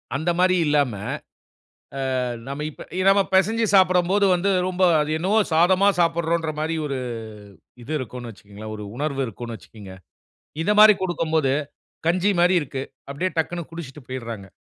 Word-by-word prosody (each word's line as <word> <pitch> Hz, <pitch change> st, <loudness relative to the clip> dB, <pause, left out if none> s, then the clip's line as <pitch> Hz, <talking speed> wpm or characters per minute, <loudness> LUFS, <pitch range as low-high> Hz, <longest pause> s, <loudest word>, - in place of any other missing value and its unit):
அந்த 160 Hz, +5 st, 0 dB
மாரி 185 Hz, 0 st, +4 dB
இல்லாம, 145 Hz, -5 st, +2 dB, 1.3 s
ஆ -, -, +1 dB, 0.3 s
நாம 140 Hz, +2 st, -4 dB
இப்ப -, -, -12 dB, 0.2 s
நாம 200 Hz, +1 st, +5 dB
பெசஞ்சு 220 Hz, +5 st, +3 dB
சாப்படும்போது 185 Hz, +1 st, +4 dB
வந்து, 185 Hz, +3 st, +1 dB, 0.2 s
ரொம்ப 185 Hz, 0 st, -2 dB, 0.2 s
அது 150 Hz, +1 st, -1 dB
என்னவோ 195 Hz, +6 st, +1 dB
சாதமா 185 Hz, +5 st, +4 dB
சாப்பிட்றோன்ற 165 Hz, -1 st, 0 dB
மாரி 160 Hz, +1 st, -1 dB
ஒரு 135 Hz, -2 st, -3 dB, 0.9 s
இது 140 Hz, -, -8 dB
இருக்கும்ன்னு 125 Hz, -1 st, -7 dB
வச்சுக்கோங்களேன். 105 Hz, +2 st, -10 dB
ஒரு 105 Hz, -, -7 dB
உணர்வு 140 Hz, -1 st, -2 dB
இருக்குன்னு 115 Hz, +2 st, -7 dB
வச்சுக்கங்க. 100 Hz, -4 st, -13 dB, 0.7 s
இத 205 Hz, -, 0 dB
மாரி 215 Hz, 0 st, +9 dB
குடுக்கும்போது, 160 Hz, -6 st, 0 dB, 0.6 s
கஞ்சி 185 Hz, +4 st, +2 dB
மாரி 180 Hz, +1 st, +4 dB
இருக்கு. 135 Hz, -1 st, -5 dB, 0.3 s
அப்டியே 180 Hz, +7 st, -1 dB
டக்குன்னு 170 Hz, +1 st, -2 dB
குடிச்ட்டு 150 Hz, -4 st, -9 dB
போய்றாங்க. 115 Hz, -6 st, -6 dB
160 Hz, 140 wpm, -23 LUFS, 130-185 Hz, 1.3 s, மாரி